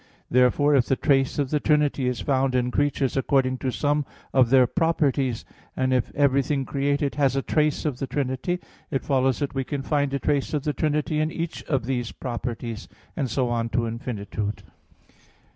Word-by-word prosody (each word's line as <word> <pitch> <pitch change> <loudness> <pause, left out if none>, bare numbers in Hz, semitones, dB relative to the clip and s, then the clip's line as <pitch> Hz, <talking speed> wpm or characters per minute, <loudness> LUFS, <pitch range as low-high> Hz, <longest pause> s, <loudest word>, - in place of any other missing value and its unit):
Therefore 125 +4 +4
if 130 -4 +3
the 135 - +2
trace 135 -1 +2
of 140 -3 -1
the 150 - +2
Trinity 145 -3 +2
is 125 -4 -1
found 130 +2 +1
in 125 0 +1
creatures 140 -1 0
according 130 -1 +1
to 130 - -1
some 145 +3 0 0.3
of 130 -3 +4
their 130 0 +6
properties, 140 -5 0 0.3
and 130 0 +1
if 125 -2 0
everything 140 -1 +2
created 140 +1 0
has 135 -2 +3
a 135 - 0
trace 150 -1 +1
of 140 -4 -2
the 135 - -2
Trinity, 135 +6 -2 0.3
it 135 - -2
follows 130 -2 +2
that 145 0 -3
we 135 -1 -1
can 140 +1 -4
find 145 -1 0
a 140 - 0
trace 145 +1 0
of 145 - -1
the 150 -1 -1
Trinity 150 0 0
in 155 +1 0
each 165 0 -4
of 135 -5 -1
these 125 -2 -2
(properties): 120 -4 -5 0.3
and 135 -5 -1
so 125 +1 0
on 115 -1 -1
to 115 0 0
infinitude. 110 -3 -4
135 Hz, 185 wpm, -25 LUFS, 125-145 Hz, 0.3 s, their